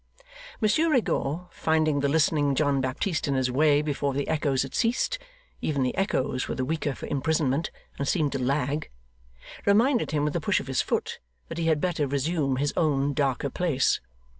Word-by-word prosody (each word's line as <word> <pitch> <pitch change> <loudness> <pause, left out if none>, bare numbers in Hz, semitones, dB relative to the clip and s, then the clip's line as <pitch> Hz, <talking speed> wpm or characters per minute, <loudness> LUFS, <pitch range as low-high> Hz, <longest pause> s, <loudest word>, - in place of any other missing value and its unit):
Monsieur 310 +10 +3
Rigaud, 180 - 0
finding 155 -2 +1
the 140 0 +1
listening 150 -2 +2
John 140 -1 +2
Baptist 145 +7 -1
in 140 - +1
his 130 -1 +1
way 145 +2 +3
before 140 -2 -1
the 140 - -1
echoes 145 -4 +1
had 135 - -8
ceased 245 - 0 0.4
(even 140 -4 0
the 125 - -1
echoes 130 -9 0
were - - -3
the 130 - -2
weaker 150 -2 -2
for - - -7
imprisonment, 145 +1 0 0.3
and 140 - -1
seemed 150 -1 +1
to 135 - -2
lag), 140 +3 -1 0.7
reminded 230 +5 +3
him 150 -1 0
with 150 - -2
a 170 - 0
push 190 +4 +2
of - - -7
his 135 -1 0
foot - - -2 0.3
that - - -5
he 165 - 0
had 155 -2 +3
better 170 -4 0
resume 140 0 0
his 145 +2 -1
own 145 -3 +1
darker 140 0 0
place. 160 -7 +1
145 Hz, 185 wpm, -26 LUFS, 135-160 Hz, 0.7 s, Monsieur